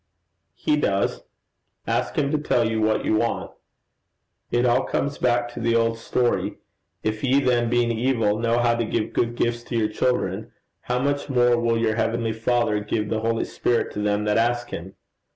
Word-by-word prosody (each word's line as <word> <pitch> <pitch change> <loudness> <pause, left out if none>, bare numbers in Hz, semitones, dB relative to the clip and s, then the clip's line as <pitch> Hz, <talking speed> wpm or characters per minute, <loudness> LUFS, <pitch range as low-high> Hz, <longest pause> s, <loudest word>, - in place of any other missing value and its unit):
'He 150 - +1
does: 100 -9 0 0.6
ask - - -1
him 140 -2 +1
to 155 - +1
tell 120 -5 +1
you 110 -1 -1
what 110 0 +1
you 110 - +2
want. 115 +1 -1 1.0
It 120 +1 +1
all 125 +2 +3
comes 140 +1 -2
back 120 -1 +2
to 120 - -8
the 115 0 +1
old 115 0 +1
story: 120 +1 0 0.5
"If 110 0 -2
ye 135 +1 +4
then 120 -3 +2
being 120 0 +2
evil, 115 -3 +1
know 115 0 +1
how 120 -1 +3
to 115 0 0
give 110 -1 -2
good 120 0 0
gifts 120 0 0
to 120 - -3
your 110 -2 +1
children, 110 -2 -1 0.3
how 125 - -2
much 140 +2 -1
more 125 -2 +4
will 115 -1 +1
your 115 -1 0
heavenly 115 0 0
Father 115 -1 +1
give 105 0 -2
the 110 - 0
holy 115 +1 0
Spirit 120 - 0
to - - -4
them 105 0 0
that 105 +1 +2
ask 120 +1 0
him!" 90 +3 -7
115 Hz, 190 wpm, -24 LUFS, 110-120 Hz, 1.0 s, ye